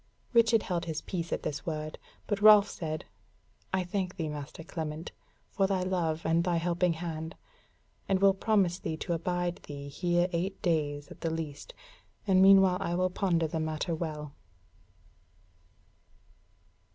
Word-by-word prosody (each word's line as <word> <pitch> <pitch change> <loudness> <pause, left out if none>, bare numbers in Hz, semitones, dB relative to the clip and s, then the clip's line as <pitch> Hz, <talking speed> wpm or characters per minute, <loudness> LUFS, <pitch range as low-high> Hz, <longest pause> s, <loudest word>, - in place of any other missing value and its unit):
Richard 230 -2 +5
held 175 -3 -2
his 160 -2 -4
peace 170 -3 -4
at - - -2
this 145 -1 -3
word, 155 -1 -4 0.3
but 205 -1 -2
Ralph 210 -1 +8
said: 155 -2 -5 0.7
"I 190 -1 +1
thank 185 0 -3
thee, 165 -4 -3
Master 150 +2 -7
Clement, 160 -1 -5 0.4
for 195 -1 +2
thy 190 -2 0
love 170 -4 -1
and 165 +1 +3
thy 175 -1 +1
helping 175 +1 +1
hand; 160 -1 -5 0.7
and 190 -1 +3
will 195 0 +6
promise 190 -3 +1
thee 160 - -3
to 175 - -2
abide 175 +1 -1
thee 140 -1 -8
here 175 +3 +1
eight 185 +3 -2
days 145 -4 0
at - - -13
the 165 - 0
least; 160 - -5 0.5
and 190 -2 +4
meanwhile 190 -1 +7
I 175 -3 -1
will 185 +1 +1
ponder 175 -4 +1
the 160 +1 -3
matter 155 +2 -2
well." 150 -3 -4
170 Hz, 150 wpm, -30 LUFS, 160-190 Hz, 0.7 s, Ralph